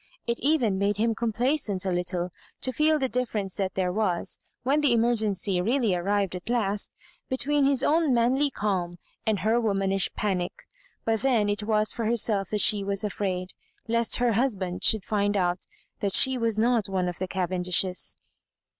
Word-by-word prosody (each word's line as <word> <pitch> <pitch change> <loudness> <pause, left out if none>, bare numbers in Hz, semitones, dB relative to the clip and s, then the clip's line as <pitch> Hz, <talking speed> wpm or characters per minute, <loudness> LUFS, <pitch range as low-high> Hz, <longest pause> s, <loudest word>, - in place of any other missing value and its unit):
It 235 0 -2
even 250 -9 +1
made 200 0 0
him 225 +2 +1
complaisant 230 -3 -1
a 190 - 0
little 180 0 -1 0.3
to 260 - +1
feel 305 +4 +3
the 270 -3 0
difference 225 -6 -2
that 190 -2 -2
there 185 -1 0
was, 185 -3 -1 0.2
when 280 +4 +2
the 285 -5 +3
emergency 215 -5 +1
really 230 0 +1
ar 175 - -2
rived 200 0 0
at 180 +5 -8
last, 210 -4 0 0.3
between 275 +2 +2
his 275 -1 +3
own 315 -1 +2
manly 255 +4 +2
calm 185 -7 -2 0.3
and 210 -5 +1
her 225 +4 +2
womanish 195 -3 +1
panic. 185 -4 -2 0.4
But 225 -1 0
then 235 -6 +2
it 205 +1 -1
was 215 0 +1
for 230 - -3
her 230 +2 +1
self 200 -4 +1
that 210 -1 +2
she 205 -2 +4
was 200 0 -1
afraid, 185 -3 -3 0.4
lest 230 0 +2
her 245 -1 +1
husband 200 -7 -1
should 220 -4 +3
find 205 -1 0
out 180 -1 -1 0.3
that 200 -2 -1
she 265 0 +5
was 230 -3 0
not 230 -2 +2
one 185 -2 -1
of 175 - -5
the 185 - -2
Cavendishes. 180 0 0
210 Hz, 180 wpm, -26 LUFS, 190-235 Hz, 0.4 s, she